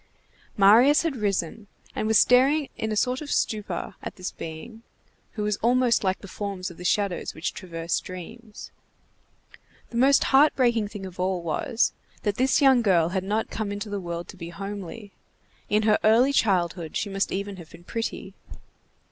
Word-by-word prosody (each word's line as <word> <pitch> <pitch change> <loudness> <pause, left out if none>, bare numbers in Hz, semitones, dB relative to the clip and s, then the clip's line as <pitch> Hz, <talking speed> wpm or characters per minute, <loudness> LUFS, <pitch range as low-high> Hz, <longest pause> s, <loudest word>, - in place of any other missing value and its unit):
Marius 235 +10 +6
had 325 -4 -1
risen, 205 -1 -2 0.3
and 215 - -1
was 220 -1 +4
staring 270 +4 +4
in 220 - -3
a - - -1
sort 250 +5 0
of 295 - -7
stupor 210 -6 -2
at - - -7
this 185 0 -5
being, 165 +8 -9 0.5
who 210 - -3
was 210 -1 0
almost 245 0 +2
like 190 -1 0
the 200 - -10
forms 195 -2 -5
of 170 - -14
the 180 - -9
shadows 195 0 -1
which 160 +3 -3
traverse 170 -2 -3
dreams. 210 +5 -10 1.2
The 235 - -4
most 275 +3 +5
heart 290 +3 +6
breaking 235 -5 +2
thing 205 -2 -8
of 185 -1 -10
all 185 -1 -1
was, 225 - 0 0.3
that 205 -2 -1
this 265 +3 +2
young 265 -3 +6
girl 175 -7 +3
had 185 0 -2
not 210 +3 -2
come 215 -2 -3
into 205 +1 -5
the 200 -1 -3
world 170 -1 -5
to - - -11
be 170 -1 -7
homely. 200 +2 -7 0.6
In 210 +1 +2
her 215 -1 +3
early 235 +6 +4
childhood 175 - 0
she - - -2
must 195 0 -1
even 200 0 -4
have 170 -3 -11
been 175 - -15
pretty. 210 -1 -5
205 Hz, 180 wpm, -25 LUFS, 185-230 Hz, 1.2 s, Marius